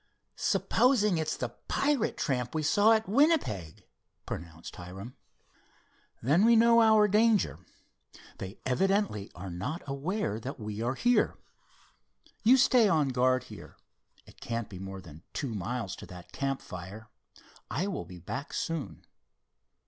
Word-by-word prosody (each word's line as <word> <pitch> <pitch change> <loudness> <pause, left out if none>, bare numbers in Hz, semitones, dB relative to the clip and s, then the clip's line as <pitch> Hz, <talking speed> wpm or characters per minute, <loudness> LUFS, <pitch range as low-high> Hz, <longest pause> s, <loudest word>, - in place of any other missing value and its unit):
"Supposing 210 -9 +2
it's 155 -1 -2
the 125 - -3 0.2
pirate 280 -5 +1
tramp 125 -1 -2
we 155 - 0
saw 205 +9 +5
at 220 0 +1
Winnipeg?" 195 - +1 0.4
propounded 85 0 -7
Hiram. 95 +7 -9 1.1
"Then 150 - +4
we 230 +1 +6
know 230 +1 +6
our 220 -2 +6
danger. 215 0 +3 0.8
They 95 +2 -7
evidently 190 - +1
are 90 +1 -7
not 95 - -4
aware 140 - -2
that 130 +4 -7
we 105 0 -5
are 120 +3 -1
here. 245 - +2 1.1
You 245 +4 +7
stay 250 -4 +5
on 155 -6 +2
guard 130 0 +2
here. - - -12 0.5
It - - -18
can't 115 -1 -3
be 95 - -9
more 95 0 -7
than 80 -3 -13
two 135 -6 -3
miles 105 0 -3
to - - -10
that 90 -1 -12
campfire. 110 -6 -5 0.6
I 170 - -1
will 200 -2 -3
be 90 - -11
back 130 - -6
soon." 165 -4 -4
135 Hz, 135 wpm, -29 LUFS, -, 1.1 s, You